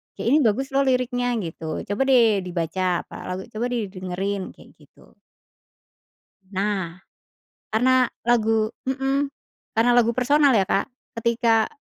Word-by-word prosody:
kayak, - - -4
"Ini 290 - +6
bagus 265 +1 +1
loh 275 0 +2
liriknya" 245 -1 +1
gitu, 160 -1 -5
"coba 205 +5 -3
deh 230 -6 +5
dibaca 180 0 -1
apa - - -13
lagu, 185 +1 -4
coba 220 +3 -2
deh 235 -6 -3
dengerin," 185 +1 -4
kayak - - -17
gitu. - - -22 1.4
Nah. 190 -3 -2 0.7
Karena 255 +3 +3 0.2
lagu 225 -2 +2 0.2
hmm, 270 +2 0 0.5
karena 230 +2 +4
lagu 235 -1 +3
personal 280 +1 +4
ya 200 - +4
Kak, 195 - 0 0.3
ketika 230 -1 +2
225 Hz, 130 wpm, -23 LUFS, 190-250 Hz, 1.4 s, Ini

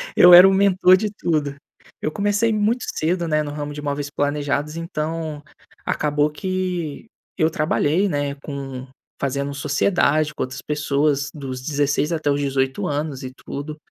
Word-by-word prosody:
eu 180 0 +8
era 180 +2 +11
o 195 - +3
mentor 190 -1 +5
de 210 +2 -2
tudo. 155 -8 -1 0.5
Eu - - -1
comecei 205 +4 +1
muito 215 +4 +1
cedo, 170 +2 0
né, 155 -1 +1
no 145 - -5
ramo 145 0 -5
de 150 - -7
móveis 145 0 -3
planejados 145 +1 -1
então, 160 -2 -4 0.4
acabou 150 0 +1
que 185 0 -3 0.3
eu 160 -2 +3
trabalhei, 155 +4 +1
né, 145 -2 -2
com 135 -2 -7 0.3
fazendo 140 +1 -2
sociedade 150 +1 +1
com - - -7
outras 130 0 -6
pessoas 145 -1 0
dos 130 -4 -6
16 145 +2 0
até 155 -3 0
os 140 - 0
18 135 -1 -1
anos 145 -2 -3
e 130 - -6
tudo, 150 +2 -6
150 Hz, 155 wpm, -21 LUFS, 140-170 Hz, 0.5 s, era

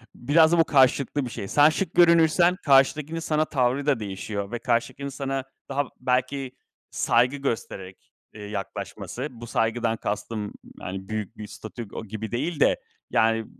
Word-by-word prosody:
biraz 160 +5 +4
da 170 - +3
bu - - +7
karşılıklı 135 +1 +3
bir - - -5
şey. 100 -3 -6
Sen 145 +8 +5
şık 170 +2 -2
görünürsen 170 0 +5
karşıdakinin 145 +3 +3
sana 155 -1 0
tavrı 135 -1 0
da 145 -5 +2
değişiyor 100 0 -5
ve 120 - -3
karşıdakinin 125 +3 -1
sana 135 -1 -3 0.3
daha 140 +1 0 0.2
belki 130 +1 -1 0.4
saygı 125 +4 +2
göstererek, 100 -8 -5 0.2
eee, 105 - -11
yaklaşması; 105 +5 -5
bu 120 -1 -10
saygıdan 115 0 0
kastım, 105 0 -4 0.3
hani, 95 +1 -6
büyük 110 -2 -4
bir 105 - -7
statüko 110 +1 -8
gibi 110 +1 -6
değil 150 +6 -2
de, - - +4 0.3
yani, 115 0 +2
125 Hz, 150 wpm, -25 LUFS, 110-145 Hz, 0.4 s, bu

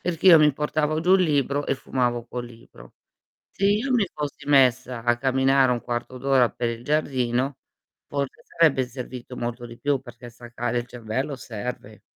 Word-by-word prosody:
perché 175 0 -2
io 165 -3 +10
mi 150 -2 +5
portavo 150 +1 -1
giù 180 +3 +4
il 190 - +4
libro 145 -3 0
e - - +1
fumavo 120 -3 -2
col 120 0 -5
libro. 115 - -16 0.6
Se 195 - -1
io 215 +7 +2
mi 225 -5 +3
fossi 150 -2 -5
messa 130 -3 +3
a 120 0 +2
camminare 135 0 +3
1/4 120 +1 -3
d'ora 130 -2 +3
per 120 -1 -2
il 115 0 -6
giardino 130 -3 0 0.5
forse 140 -2 -4
sarebbe 155 -6 +3
servito 125 0 -8
molto 120 0 -4
di 120 0 -11
più, 140 +1 +1
perché 120 -1 -11
staccare 120 +1 -4
il 120 - -7
cervello 125 +4 -4
serve. 110 -3 -7
130 Hz, 170 wpm, -24 LUFS, 120-145 Hz, 0.6 s, io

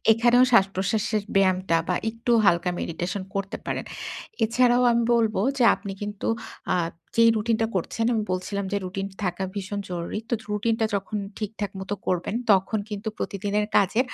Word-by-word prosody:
এখানেও 240 +2 +5
শ্বাসপ্রশ্বাসের 205 +1 +2
ব্যায়ামটা 185 -2 +3
বা 180 - +2 0.2
একটু 230 +2 -1
হালকা 180 -2 +3
meditation 175 +4 -3
করতে 195 0 -2
পারেন। - - -2 0.6
এছাড়াও 245 +2 +3
আমি 235 0 +2
বলব 225 -2 +2 0.2
যে, 245 - +4
আপনি 200 - -7
কিন্তু 205 -1 -4 0.5
আ - - +2 0.4
যেই 230 0 +7
routine 220 +1 +1
টা - - +3
করছেন 225 +5 -1
আমি 220 - +1
বলছিলাম 200 +2 -2
যে, - - +2
routine 195 +1 -4
থাকা 180 +1 -2
ভীষণ 200 0 -4
জরুরি। 175 +3 -3
তো - - +3 0.2
routine 225 +2 +1
টা 220 - +3
যখন 200 +2 -2 0.2
ঠিকঠাক 210 -2 -4
মত 190 - -7 0.2
করবেন 180 +2 -1 0.2
তখন 195 +3 +2
কিন্তু 210 +1 -4
প্রতিদিনের 205 +1 -1
কাজে 205 +4 +3
205 Hz, 160 wpm, -25 LUFS, 190-225 Hz, 0.6 s, যেই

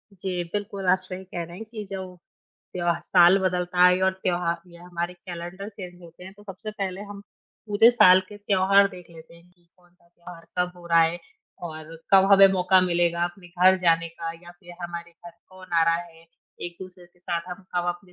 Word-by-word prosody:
जी, 185 -2 -4
बिल्कुल, 200 -1 -4
आप 185 +1 +3
सही 185 0 -8
कह 175 -2 -6
रहे 170 +1 -10
हैं 220 - -8
कि 220 -1 -8
जो 195 -1 -4 0.7
त्य - - -6
जब 170 0 0
साल 180 +1 +5
बदलता 180 -1 0
है 180 0 +5
और 190 0 +3
त्योहार 175 -1 -1
या 170 0 -15
हमारे 175 0 -4
कैलेंडर 175 +2 -8
चेंज 180 -4 -11
होते 170 +1 -14
हैं 190 - -10
तो 205 - -16
सबसे 205 +1 -8
पहले 195 -3 -5
हम 200 -1 -9 0.5
पूरे 215 +2 +5
साल 185 -6 +6
के 210 - -11
त्योहार 200 -1 +3
देख 180 -3 -13
लेते 165 0 -15
हैं 170 +1 -20
कि 175 -1 -33
कौन-सा 175 -1 -29
त्योहार 170 0 -14
कब 180 0 0
हो 175 -1 -13
रहा 170 -1 +4
है 165 +1 0 0.5
और 155 0 -10 0.2
कब 190 0 +7
हमें 195 0 +9
मौका 185 0 +4
मिलेगा 170 -1 +1
अपने 175 +1 -8
घर 180 +2 +4
जाने 165 -1 +2
का 165 0 -6
या 175 - -12
फिर 175 -2 -13
हमारे 170 0 -6
घर 175 +1 -14 0.2
कौन 185 -1 -15
आ 165 -1 +4
रहा 165 0 +3
है। 165 -1 -11 0.4
एक-दूसरे 180 +1 -9
के 175 +1 -32
साथ 175 -1 -3
हम 180 +2 -8
कब 175 0 0
अपने 175 +1 -6
180 Hz, 210 wpm, -24 LUFS, 170-190 Hz, 0.7 s, हमें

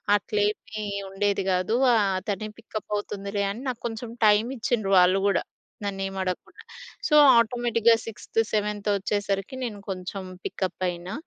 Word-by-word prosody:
అట్లేమీ 210 +2 -1 0.2
ఉండేది 195 0 0
గాదు. 185 +5 +1 0.2
ఆహ్, 200 -4 +2
తనే 215 +1 -2
పికప్ 220 -2 -7
అవుతుందిలే 200 0 -3
అని 235 +6 -7
నాకొంచెం 235 -1 -5
టైము 215 +3 +4
ఇచ్చిండ్రు 215 -4 0
వాళ్ళు 185 +2 +4
గూడా. 195 -3 +2 0.4
నన్నేమడగకుండా. 195 -2 -4 0.4
సో, 300 - +3 0.2
ఆటోమేటిక్‌గా 235 -1 +3
సిక్స్త్, 225 0 -4
సెవెంత్ 210 0 -1
వచ్చేసరికి, 200 +2 -2
నేను 215 -4 -4
కొంచెం 190 +1 -5 0.2
పికప్ 185 -1 -3
అయినా. 175 +1 -6
205 Hz, 125 wpm, -26 LUFS, 195-225 Hz, 0.4 s, టైము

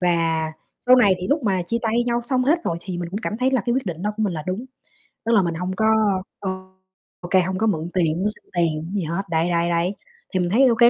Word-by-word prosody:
Và 165 -3 +1 0.3
sau 255 +1 +8
này 200 -6 +5
thì 185 - -3
lúc 290 0 +2
mà 190 -4 +1
chia 230 +7 -1
tay 230 +2 +1
nhau 240 0 +1
xong 255 +1 0
hết 315 +5 +4
rồi 165 - 0
thì 180 -1 -5
mình 175 - -3
cũng 200 - -3
cảm 215 - -3
thấy 255 +3 +2
là 260 -3 +2
cái 240 - +2
quyết 260 -4 -1
định 175 -1 -4
đó 210 0 0
của 220 - -1
mình 205 -4 +1
là 155 - -4
đúng, 190 +7 -2 0.6
tức 230 - +1
là 210 -4 +6
mình 170 -2 -1
hông 180 +2 -3
có 220 +2 +1 0.5
ô 190 - -3 0.7
ô 175 - -8
kê 190 - +5
hông 185 +1 -2
có 220 +3 +1
mượn 165 -4 -1
tiền 165 -3 +1
hông 200 - +1
xin - - -12
tiền, 160 -3 +1
hổng 180 - -7
gì 190 - 0
hết. 170 +5 -2
Đấy, 165 +1 +1
đấy, 170 0 +1
đấy, 170 +4 0 0.4
thì 185 - +1
mình 175 -1 +1
thấy 250 +7 +5
ô 235 - +4
kê 235 +1 +7
185 Hz, 285 wpm, -22 LUFS, 170-230 Hz, 0.7 s, sau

